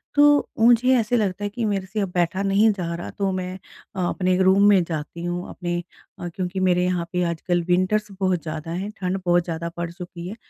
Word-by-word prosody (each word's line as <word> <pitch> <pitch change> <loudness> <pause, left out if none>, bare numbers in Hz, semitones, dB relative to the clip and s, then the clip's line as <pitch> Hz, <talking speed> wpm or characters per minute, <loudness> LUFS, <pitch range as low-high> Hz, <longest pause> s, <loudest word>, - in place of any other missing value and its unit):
तो 290 0 +5
मुझे 240 +3 +5
ऐसा 230 +2 0
लगता 205 -2 0
है 205 - -1
कि 225 +2 -3
मेरे 195 -2 -1
से 200 +3 -4
अब 195 - -1
बैठा 175 +2 +1
नहीं 200 +3 +4
जा 175 -4 -3
रहा 170 - -6
तो 195 -1 -2
मैं 185 0 -3 0.4
अ, 185 - -1
अपने 185 -1 +1
रूम 190 +2 +5
में 195 -3 +5
जाती 165 0 -5
हूँ, 175 +1 -3
अपने 175 -1 -3 0.5
क्योंकि 185 0 -3
मेरे 180 -1 +2
यहाँ 180 -2 0
पे 180 0 +1
आजकल 175 +1 -1
विंटर्स 185 +4 +2
बहुत 185 -3 +1
ज़्यादा 160 0 -5
हैं, 190 +4 -3
ठंड 185 +1 -2
बहुत 175 0 +3
ज़्यादा 170 0 -4
पड़ 170 -1 -3
चुकी 175 -1 -8
है। 205 - -6
185 Hz, 210 wpm, -23 LUFS, 175-200 Hz, 0.5 s, तो